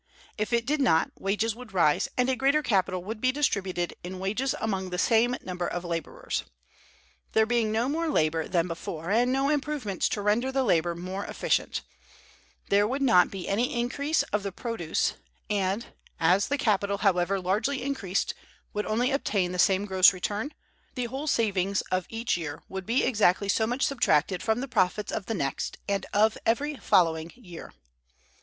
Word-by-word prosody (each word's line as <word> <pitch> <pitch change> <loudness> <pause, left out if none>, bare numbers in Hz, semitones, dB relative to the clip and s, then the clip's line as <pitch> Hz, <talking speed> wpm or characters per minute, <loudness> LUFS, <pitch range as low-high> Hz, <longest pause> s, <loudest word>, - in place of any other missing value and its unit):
If 215 +2 -2
it 235 -1 +1
did 290 +3 0
not, 165 -11 +3
wages 210 +3 0
would 235 -5 -12
rise, 155 -4 +3
and 250 0 +3
a 260 - +2
greater 280 +4 +2
capital 185 -5 +1
would 215 +3 -6
be 255 - +3
distributed 195 -11 -1
in 185 +1 -6
wages 215 +8 -1
among 190 -4 -2
the 180 - -3
same 235 +5 +3
number 180 -1 -3
of 175 0 -4
laborers. 165 -3 -3 0.9
There 220 - +4
being 225 -1 +1
no 225 +3 +1
more 325 +4 -1
labor 160 - +1
than 170 -1 +1
before, 165 0 -5
and 240 +4 +3
no 270 +1 +1
improvements 290 - -1
to 205 - -2
render 230 +6 +1
the 265 0 +1
labor 170 -6 +2
more 185 +3 -5
efficient, - - -1 0.9
there 205 +1 +4
would 270 +4 -1
not 180 -9 +5
be 195 -2 -6
any 235 +4 0
increase 280 +6 0
of 210 - +2
the 200 0 -4
produce; 185 -5 -1 0.4
and, 200 +2 -1 0.3
as 180 +5 +3
the 285 - 0
capital, 200 -5 +1
however 190 0 +2
largely 215 +9 0
increased, 225 -9 -1 0.4
would 210 0 -2
only 240 +5 +1
obtain 200 -9 0
the 180 - -4
same 195 +1 +3
gross 190 -1 +6
return, 205 +8 -3 0.4
the 250 -2 -1
whole 265 +5 -5
savings 200 -7 +1
of 185 -1 0
each 225 +1 -1
year 160 -3 -5
would 190 -1 -6
be 235 +4 +2
exactly 205 -4 +2
so 220 +3 +2
much 245 +3 -1
subtracted 185 - +2
from 220 +2 0
the 270 - -4
profits 205 -3 0
of 205 - -4
the 225 - -1
next 140 -7 -3
and 200 -1 -1
of 215 +2 +3
every 290 +7 0
following 165 -5 +2
year. 180 -9 -11
205 Hz, 175 wpm, -27 LUFS, 185-245 Hz, 0.9 s, gross